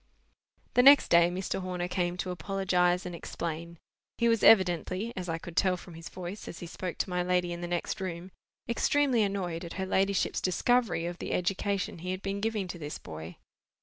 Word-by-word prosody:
The 245 Hz, -, +6 dB
next 280 Hz, +2 st, +8 dB
day 170 Hz, 0 st, +6 dB
Mr. 190 Hz, +1 st, -3 dB
Horner 180 Hz, -1 st, -3 dB
came 180 Hz, -1 st, -1 dB
to 185 Hz, 0 st, -3 dB
apologize 180 Hz, 0 st, +1 dB
and 180 Hz, -, -5 dB
explain. 170 Hz, 0 st, -5 dB, 0.4 s
He 235 Hz, -, +2 dB
was 230 Hz, -2 st, +3 dB
evidently—as 185 Hz, 0 st, +3 dB
I 165 Hz, -, -1 dB
could 170 Hz, 0 st, -10 dB
tell 185 Hz, +1 st, +3 dB
from 175 Hz, 0 st, -12 dB
his 165 Hz, +1 st, -9 dB
voice, 185 Hz, +3 st, -7 dB
as 170 Hz, -, -7 dB
he -, -, -7 dB
spoke 180 Hz, +1 st, -5 dB
to -, -, -1 dB
my 180 Hz, 0 st, +1 dB
lady 180 Hz, -1 st, +1 dB
in 170 Hz, -, -6 dB
the 175 Hz, -, -3 dB
next 175 Hz, +3 st, -2 dB
room—extremely 225 Hz, +8 st, -1 dB
annoyed 185 Hz, -4 st, -1 dB
at 170 Hz, -, -7 dB
her 190 Hz, -, -3 dB
ladyship's 195 Hz, 0 st, +1 dB
discovery 225 Hz, 0 st, +1 dB
of 175 Hz, 0 st, -5 dB
the -, -, -3 dB
education 190 Hz, 0 st, -1 dB
he 180 Hz, +2 st, -6 dB
had 185 Hz, +1 st, -3 dB
been 195 Hz, +1 st, -3 dB
giving 215 Hz, -3 st, -1 dB
to 175 Hz, -, -6 dB
this 150 Hz, -1 st, -5 dB
boy. 80 Hz, +2 st, -9 dB
180 Hz, 190 wpm, -29 LUFS, 175-195 Hz, 0.4 s, next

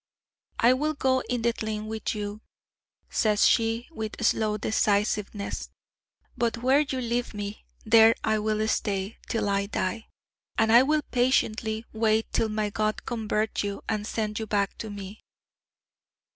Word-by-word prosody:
'I 240 Hz, +2 st, +5 dB
will 300 Hz, +4 st, 0 dB
go 260 Hz, -2 st, +2 dB
in 245 Hz, -2 st, -1 dB
the 235 Hz, 0 st, +2 dB
tlain 215 Hz, -1 st, -4 dB
with 220 Hz, 0 st, -3 dB
you,' 205 Hz, 0 st, -5 dB, 0.7 s
says 210 Hz, -2 st, +3 dB
she 225 Hz, +1 st, +1 dB
with 220 Hz, -5 st, -4 dB
slow 215 Hz, -1 st, +2 dB
decisiveness: 210 Hz, -1 st, 0 dB, 0.7 s
'but 235 Hz, 0 st, 0 dB
where 260 Hz, +4 st, +3 dB
you 275 Hz, -3 st, -1 dB
leave 240 Hz, -1 st, -2 dB
me, 205 Hz, 0 st, -6 dB, 0.2 s
there 225 Hz, 0 st, +7 dB
I 220 Hz, -1 st, +2 dB
will 215 Hz, 0 st, 0 dB
stay, 200 Hz, -1 st, -1 dB
till 220 Hz, -3 st, 0 dB
I 200 Hz, 0 st, 0 dB
die; 220 Hz, +2 st, -3 dB, 0.5 s
and 220 Hz, 0 st, +3 dB
I 235 Hz, +2 st, +9 dB
will 300 Hz, +3 st, +2 dB
patiently 230 Hz, -3 st, +1 dB
wait 220 Hz, 0 st, +1 dB
till 225 Hz, -, +1 dB
my 215 Hz, -1 st, -1 dB
God 215 Hz, 0 st, -1 dB
convert 220 Hz, -2 st, -1 dB
you, 200 Hz, -1 st, -4 dB
and 210 Hz, -1 st, -2 dB
send 215 Hz, -2 st, -2 dB
you 220 Hz, -, -4 dB
back 200 Hz, -1 st, 0 dB
to 220 Hz, -, -5 dB
me.' 205 Hz, 0 st, -8 dB
220 Hz, 150 wpm, -27 LUFS, 210-230 Hz, 0.7 s, I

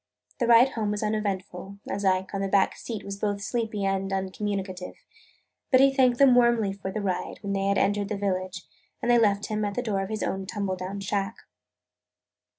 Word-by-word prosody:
The 240 Hz, -, +1 dB
ride 240 Hz, +2 st, +7 dB
home 220 Hz, -5 st, -2 dB
was 210 Hz, +1 st, -2 dB
uneventful, 200 Hz, -2 st, -3 dB
as 200 Hz, -, -3 dB
Ike, 190 Hz, 0 st, +1 dB
on 195 Hz, -, -2 dB
the 195 Hz, -, 0 dB
back 195 Hz, 0 st, +2 dB
seat, 225 Hz, -4 st, -6 dB
was 200 Hz, 0 st, -6 dB
both 205 Hz, -1 st, -1 dB
sleepy 220 Hz, -3 st, -2 dB
and 195 Hz, 0 st, -1 dB
uncommunicative. 190 Hz, -1 st, -3 dB, 0.7 s
But 255 Hz, -, +5 dB
he 270 Hz, 0 st, +5 dB
thanked 255 Hz, -3 st, +3 dB
them 275 Hz, -1 st, +6 dB
warmly 235 Hz, -5 st, +3 dB
for 195 Hz, -1 st, -6 dB
the 215 Hz, -, -3 dB
ride 185 Hz, -2 st, -2 dB
when 200 Hz, 0 st, -2 dB
they 195 Hz, 0 st, 0 dB
had 200 Hz, 0 st, +2 dB
entered 205 Hz, 0 st, +1 dB
the 210 Hz, -, -2 dB
village, 185 Hz, -1 st, -2 dB, 0.3 s
and 240 Hz, -, +1 dB
they 240 Hz, -, +6 dB
left 205 Hz, -2 st, +2 dB
him 215 Hz, 0 st, -2 dB
at 205 Hz, -1 st, -2 dB
the 245 Hz, -, -1 dB
door 205 Hz, -5 st, -1 dB
of 195 Hz, -, -4 dB
his 215 Hz, -1 st, -3 dB
own 190 Hz, 0 st, -3 dB
tumble 200 Hz, -2 st, -2 dB
down 185 Hz, +2 st, -5 dB
shack. 195 Hz, 0 st, -2 dB
200 Hz, 205 wpm, -26 LUFS, 195-220 Hz, 0.7 s, ride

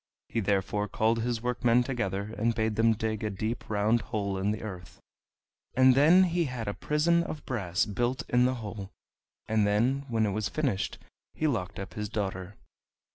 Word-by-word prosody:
He -, -, -1 dB
therefore 105 Hz, 0 st, 0 dB
called 110 Hz, +3 st, +1 dB
his 120 Hz, -1 st, -2 dB
workmen 125 Hz, 0 st, +2 dB
together, 110 Hz, -5 st, -3 dB
and 115 Hz, +1 st, 0 dB
bade 110 Hz, -1 st, 0 dB
them 115 Hz, +1 st, +4 dB
dig 110 Hz, -1 st, -3 dB
a 105 Hz, -, 0 dB
deep 110 Hz, +4 st, -4 dB
round 110 Hz, +2 st, +2 dB
hole 105 Hz, -4 st, -3 dB
in 100 Hz, +2 st, 0 dB
the 105 Hz, +1 st, -2 dB
earth, 90 Hz, -5 st, -8 dB, 0.8 s
and 130 Hz, +1 st, +6 dB
then 160 Hz, +8 st, +6 dB
he 175 Hz, -1 st, +1 dB
had 125 Hz, -5 st, -5 dB
a 100 Hz, -, -1 dB
prison 165 Hz, +7 st, +2 dB
of 155 Hz, -3 st, -6 dB
brass 95 Hz, -8 st, 0 dB
built 120 Hz, +5 st, -1 dB
in 125 Hz, 0 st, +3 dB
the 130 Hz, +1 st, +1 dB
hole, 105 Hz, -4 st, -7 dB, 0.6 s
and 110 Hz, -2 st, +2 dB
then, 125 Hz, +7 st, +1 dB
when 115 Hz, -2 st, +1 dB
it 105 Hz, -, 0 dB
was 105 Hz, +1 st, -2 dB
finished, 135 Hz, -11 st, -1 dB, 0.4 s
he 155 Hz, -, -1 dB
locked 115 Hz, -12 st, -1 dB
up 95 Hz, -1 st, -7 dB
his 105 Hz, -1 st, -4 dB
daughter. 95 Hz, -2 st, -4 dB
110 Hz, 185 wpm, -29 LUFS, 105-125 Hz, 0.8 s, and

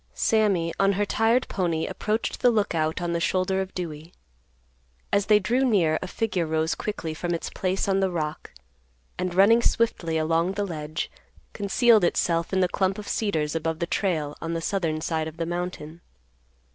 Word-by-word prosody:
Sammy, 195 Hz, -, +2 dB
on 195 Hz, 0 st, +4 dB
her 205 Hz, +2 st, 0 dB
tired 225 Hz, +4 st, +2 dB
pony, 170 Hz, -4 st, -1 dB
approached 220 Hz, +1 st, -2 dB
the 250 Hz, -, +5 dB
Lookout 175 Hz, -7 st, 0 dB
on 170 Hz, 0 st, -1 dB
the 170 Hz, -, 0 dB
shoulder 185 Hz, +2 st, +1 dB
of 190 Hz, 0 st, -5 dB
Dewey. 165 Hz, -2 st, -6 dB, 1.0 s
As 200 Hz, 0 st, +2 dB
they 210 Hz, -, +6 dB
drew 235 Hz, +7 st, +1 dB
near 180 Hz, -11 st, +2 dB
a 185 Hz, -, -4 dB
figure 185 Hz, -5 st, -1 dB
rose 160 Hz, +1 st, 0 dB
quickly 165 Hz, -7 st, -4 dB
from 175 Hz, +2 st, -2 dB
its 165 Hz, -, -5 dB
place 190 Hz, +1 st, -1 dB
on 195 Hz, -1 st, +2 dB
the 190 Hz, -1 st, +2 dB
rock, 155 Hz, -3 st, -4 dB, 0.7 s
and, 180 Hz, -1 st, -2 dB
running 215 Hz, +5 st, +6 dB
swiftly 180 Hz, -10 st, 0 dB
along 165 Hz, +3 st, +1 dB
the 205 Hz, 0 st, -1 dB
ledge, 155 Hz, -3 st, -4 dB, 0.4 s
concealed 215 Hz, +1 st, +3 dB
itself 170 Hz, -1 st, +1 dB
in 190 Hz, -1 st, +2 dB
the 180 Hz, -, +4 dB
clump 190 Hz, +1 st, 0 dB
of 210 Hz, -1 st, -8 dB
cedars 160 Hz, -9 st, -1 dB
above 165 Hz, 0 st, -2 dB
the 170 Hz, -, -1 dB
trail 160 Hz, -6 st, -1 dB
on 165 Hz, 0 st, -3 dB
the -, -, -1 dB
southern 165 Hz, -4 st, -1 dB
side 160 Hz, -1 st, -1 dB
of 160 Hz, +1 st, -9 dB
the 165 Hz, -, -2 dB
mountain. 175 Hz, -2 st, -5 dB
180 Hz, 180 wpm, -25 LUFS, 165-200 Hz, 1.0 s, they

